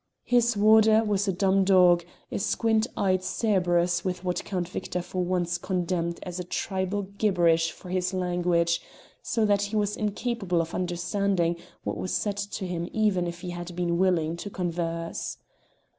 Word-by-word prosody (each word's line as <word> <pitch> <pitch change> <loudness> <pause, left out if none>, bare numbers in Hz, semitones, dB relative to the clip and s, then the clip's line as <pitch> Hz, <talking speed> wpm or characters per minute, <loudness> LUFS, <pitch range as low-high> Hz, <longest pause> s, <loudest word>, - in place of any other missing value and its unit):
His 240 -2 +2
warder 220 +1 +6
was 205 -1 0
a - - +3
dumb 195 +1 +2
dog, 180 -2 +5 0.3
a - - -2
squint 220 +1 +1
eyed 185 -2 +2
Cerberus 180 -3 +1
with 185 -1 -3
what 180 -1 -1
Count 180 -3 -3
Victor 180 - -4
for 180 +1 -3
once 175 -1 -1
condemned 175 -2 -2
as 180 -1 -6
a - - -2
tribal 190 +2 -2
gibberish 175 -5 +2
for 180 - -12
his 180 0 0
language, 175 -2 +1 0.4
so 225 -2 0
that 205 -1 +3
he 205 +2 -3
was 210 -1 +1
incapable 210 -3 -1
of 165 +1 -2
understanding 175 0 0 0.3
what - - -3
was 185 - -2
said 205 -1 -1
to 200 -1 -4
him 175 -1 -3
even 205 -5 +1
if 170 0 -6
he 180 -1 -5
had 175 0 -7
been 170 -1 0
willing 170 -4 +2
to 205 - -6
converse. 170 -3 -3
185 Hz, 165 wpm, -27 LUFS, 175-200 Hz, 0.4 s, warder